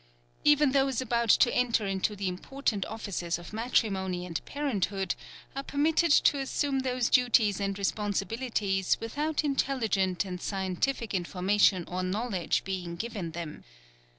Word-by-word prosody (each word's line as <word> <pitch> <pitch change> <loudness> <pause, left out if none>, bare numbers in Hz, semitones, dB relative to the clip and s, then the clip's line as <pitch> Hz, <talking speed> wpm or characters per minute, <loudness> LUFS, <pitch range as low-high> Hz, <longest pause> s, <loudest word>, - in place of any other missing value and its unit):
Even 295 -1 +5
those 270 -2 +2
about 235 -2 0
to 240 - +5
enter 235 -3 +2
into 195 +2 -1
the 195 -1 -3
important 205 +2 -2
offices 195 -6 -3
of 175 +3 -11
matrimony 195 -6 0
and 165 -3 -4
parenthood 200 -10 -1 0.4
are 275 - -2
permitted 310 +4 +1
to 285 0 +5
assume 275 0 0
those 255 -2 0
duties 230 -5 +3
and 195 -1 -2
responsibilities 205 0 0
without 295 +8 -1
intelligent 225 -10 0
and 180 -2 -6
scientific 195 +5 -2
information 185 +1 +2
or 180 +1 -3
knowledge 190 -1 -1
being 180 -3 -4
given 205 -3 -4
them. 165 -2 -6
210 Hz, 130 wpm, -29 LUFS, 190-260 Hz, 0.4 s, Even